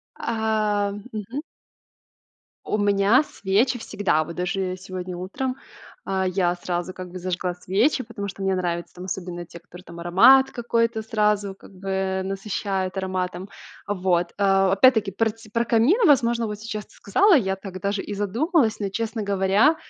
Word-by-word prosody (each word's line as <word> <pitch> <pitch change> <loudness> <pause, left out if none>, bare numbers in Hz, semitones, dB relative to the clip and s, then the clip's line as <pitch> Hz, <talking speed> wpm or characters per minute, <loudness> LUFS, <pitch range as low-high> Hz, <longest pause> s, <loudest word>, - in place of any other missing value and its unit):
А 215 -3 0
мгм. 215 +4 -6 1.2
У - - 0
меня 205 +5 +4
свечи 230 0 0
всегда, 200 -8 0
вот 170 +2 -8
даже, 185 +1 -2
э, - - -5
сегодня 185 -1 -6
утром, 255 +9 -3 0.5
а, 190 0 0
я 180 -1 +1
сразу 175 +1 -3
как 185 -1 -8
бы 185 - -7
зажгла 180 0 -2
свечи, 205 - +1
потому 215 -2 -6
что 195 0 -8
мне 195 -1 +1
нравятся 175 -2 -3
там 180 - -8
особенно 175 -2 -5
те, 170 - -12
которые 175 +1 -14
там 170 -2 -11
аромат 235 +11 +6
какой-то 230 -1 0
сразу 210 -3 0
как - - -16
бы, 195 +1 -8
э, 190 0 -1
насыщает 195 -1 -3
ароматом. 185 0 -3 0.4
Вот, 180 -3 0
а, 195 -1 +3
опять-таки 215 0 +4
про 220 +4 +1
тсь 225 +1 -12
про 235 0 +1
камин, 235 - +3
возможно, 235 -5 +3
вот 210 -1 -5
сейчас 215 -1 -5
ты - - -24
сказала. 380 - +4
Я 190 -8 +2
так 190 -1 -8
даже 200 +1 -1
и 210 - -6
задумалась, 225 - +1
но, 200 -2 -2
честно 220 +2 -3
говоря, 200 +8 +3
200 Hz, 165 wpm, -24 LUFS, 185-225 Hz, 1.2 s, аромат